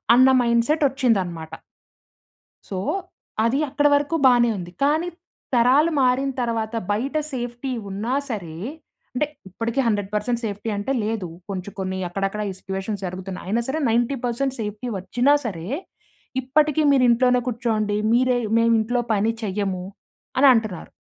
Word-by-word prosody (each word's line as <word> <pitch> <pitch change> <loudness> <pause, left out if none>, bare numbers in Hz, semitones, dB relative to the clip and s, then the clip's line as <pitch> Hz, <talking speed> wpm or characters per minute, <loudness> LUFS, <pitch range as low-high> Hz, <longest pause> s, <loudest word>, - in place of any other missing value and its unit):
అన్న 260 +1 +7
మైండ్‌సెటొచ్చిందనమాట. 235 - +1 1.2
సో, 190 - -3 0.7
అది 260 +5 +2
అక్కడ 290 +2 +3
వరకు 290 +3 0
బానే 240 -2 +6
ఉంది, 175 -1 -7
కానీ 310 +4 +2 0.5
తరాలు 260 +7 +4
మారిన 260 +2 +2
తర్వాత, 230 -1 -2 0.2
బయట 255 +9 -1 0.2
సేఫ్టీ 245 +1 -4 0.2
ఉన్నా 215 +6 -2 0.2
సరే 175 -9 -5 0.6
అంటే 300 - +2 0.2
ఇప్పటికి 230 +7 -3
100% 210 +2 0
సేఫ్టీ 210 +1 -3
అంటే 205 +6 -2
లేదు. 215 -4 -2 0.2
కొంచుం 195 +1 -5
కొన్నీ 190 0 -2
అక్కడక్కడ 195 +3 -2
ఈ - - -4
సిట్యుయేషన్స్ 195 +2 -4
జరుగుతున్నాయి. 185 +1 -6
అయినా 225 +5 +1
సరే, 300 +4 -1
90% 245 +2 0
సేఫ్టీ 210 +3 -4
వచ్చినా 245 +9 +2
సరే, 170 -6 -4 0.8
ఇప్పటికీ 300 +4 +2
మీరు 270 -2 +4
ఇంట్లోనే 250 +1 +4
కూర్చోండి. 220 -3 0 0.2
మీరే 250 +1 +3 0.2
మేమింట్లో 230 +1 +2
పని 215 +2 +2
చెయ్యము 190 -2 -2 0.6
అనంటన్నారు. 225 - +3
230 Hz, 125 wpm, -23 LUFS, 200-255 Hz, 1.2 s, అన్న